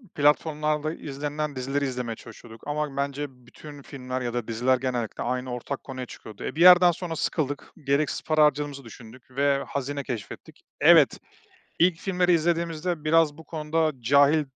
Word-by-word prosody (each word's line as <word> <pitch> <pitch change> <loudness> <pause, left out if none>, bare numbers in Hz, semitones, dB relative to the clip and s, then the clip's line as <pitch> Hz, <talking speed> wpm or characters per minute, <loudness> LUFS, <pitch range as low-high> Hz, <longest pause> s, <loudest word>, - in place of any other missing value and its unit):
platformlarda 150 +1 +1
izlenen 145 0 -4
dizileri 135 +2 -1
izlemeye 125 -3 -3
çalışıyorduk 115 0 -13
ama 150 -1 -3
bence 140 +1 -2
bütün 135 +3 -13
filmler 130 -2 -6
ya 120 -1 -3
da 120 -2 -3
diziler 120 +3 +1
genellikle 125 -3 -3
aynı 125 +1 -2
ortak 125 +3 -5
konuya 130 -2 -6
çıkıyordu. 110 -3 -11
Eee, - - -4
bir 165 - -2
yerden 180 0 +8
sonra 170 0 -5
sıkıldık, 145 -3 -2 0.2
gereksiz 140 +1 +1
para 155 -1 +3
harcadığımızı 145 -1 -1
düşündük 120 +2 -14
ve 140 +1 +1
hazine 140 +1 -3
keşfettik. 115 -7 -7 0.2
Evet, - - +6 0.6
ilk 170 0 +4
filmleri 180 -1 +1
izlediğimizde 170 0 0
biraz 155 -1 +3
bu 160 - -11
konuda 160 0 -1
cahil 140 +5 +4
145 Hz, 150 wpm, -26 LUFS, 130-155 Hz, 0.6 s, yerden